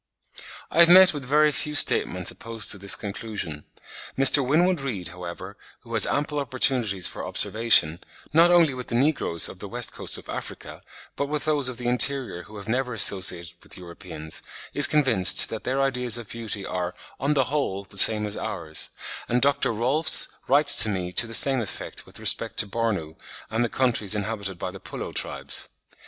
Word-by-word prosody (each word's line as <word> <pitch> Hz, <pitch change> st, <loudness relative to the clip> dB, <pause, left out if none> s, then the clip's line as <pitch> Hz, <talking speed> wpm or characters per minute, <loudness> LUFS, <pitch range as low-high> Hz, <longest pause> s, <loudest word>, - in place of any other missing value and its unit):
I 165 Hz, -, -2 dB
have 170 Hz, 0 st, +6 dB
met 185 Hz, 0 st, +7 dB
with 145 Hz, -2 st, -7 dB
very 150 Hz, +3 st, +2 dB
few 150 Hz, +1 st, -4 dB
statements 90 Hz, -9 st, +2 dB
opposed 115 Hz, -2 st, -2 dB
to 100 Hz, -, -2 dB
this 100 Hz, +1 st, +2 dB
conclusion. 100 Hz, -7 st, -7 dB, 0.5 s
Mr. 135 Hz, +1 st, +6 dB
Winwood 165 Hz, +5 st, 0 dB
Reade, 100 Hz, -11 st, -5 dB
however, 90 Hz, 0 st, -10 dB, 0.2 s
who -, -, -13 dB
has -, -, +3 dB
had -, -, -2 dB
ample 150 Hz, +1 st, -3 dB
opportunities 125 Hz, -8 st, -1 dB
for -, -, -9 dB
observation, 110 Hz, -8 st, +1 dB, 0.3 s
not 165 Hz, +2 st, +4 dB
only 170 Hz, -5 st, +3 dB
with 125 Hz, -1 st, -9 dB
the 115 Hz, -, -5 dB
negroes 130 Hz, -, +1 dB
of -, -, -12 dB
the -, -, -8 dB
West -, -, -4 dB
Coast -, -, -2 dB
of -, -, -15 dB
Africa, -, -, -9 dB, 0.3 s
but 140 Hz, -, -4 dB
with 150 Hz, 0 st, -5 dB
those 145 Hz, -4 st, -1 dB
of 125 Hz, -, -9 dB
the 120 Hz, -1 st, -6 dB
interior 125 Hz, -5 st, -1 dB
who 105 Hz, +3 st, -14 dB
have 100 Hz, 0 st, -11 dB
never 125 Hz, +1 st, -3 dB
associated 90 Hz, -5 st, +3 dB
with -, -, -10 dB
Europeans, 85 Hz, -3 st, -9 dB, 0.3 s
is 145 Hz, -1 st, +5 dB
convinced 130 Hz, -12 st, +3 dB
that 110 Hz, -, -8 dB
their 130 Hz, +2 st, -2 dB
ideas 125 Hz, -3 st, 0 dB
of 115 Hz, -3 st, -11 dB
beauty 110 Hz, -4 st, -6 dB
are 90 Hz, -1 st, -5 dB, 0.2 s
ON 140 Hz, +3 st, -1 dB
THE 135 Hz, -, +2 dB
WHOLE 100 Hz, -10 st, -3 dB
the 100 Hz, 0 st, -14 dB
same 105 Hz, +1 st, +7 dB
as 105 Hz, 0 st, -3 dB
ours; 80 Hz, -6 st, -4 dB, 0.4 s
and 120 Hz, -, 0 dB
Dr. 140 Hz, 0 st, 0 dB
Rohlfs 130 Hz, +8 st, +6 dB, 0.2 s
writes 145 Hz, 0 st, +5 dB
to 110 Hz, -, +5 dB
me 90 Hz, -3 st, -5 dB
to 120 Hz, -, +3 dB
the 115 Hz, -, -2 dB
same 135 Hz, 0 st, +2 dB
effect 105 Hz, -, -9 dB
with -, -, -11 dB
respect -, -, -2 dB
to 105 Hz, -, +2 dB
Bornu 100 Hz, -8 st, -4 dB, 0.3 s
and 115 Hz, +2 st, -1 dB
the 120 Hz, -, -3 dB
countries 110 Hz, -3 st, 0 dB
inhabited 100 Hz, -2 st, -5 dB
by 90 Hz, -, -6 dB
the 95 Hz, -, -12 dB
Pullo -, -, -9 dB
tribes. -, -, -2 dB
115 Hz, 190 wpm, -23 LUFS, 95-140 Hz, 0.5 s, met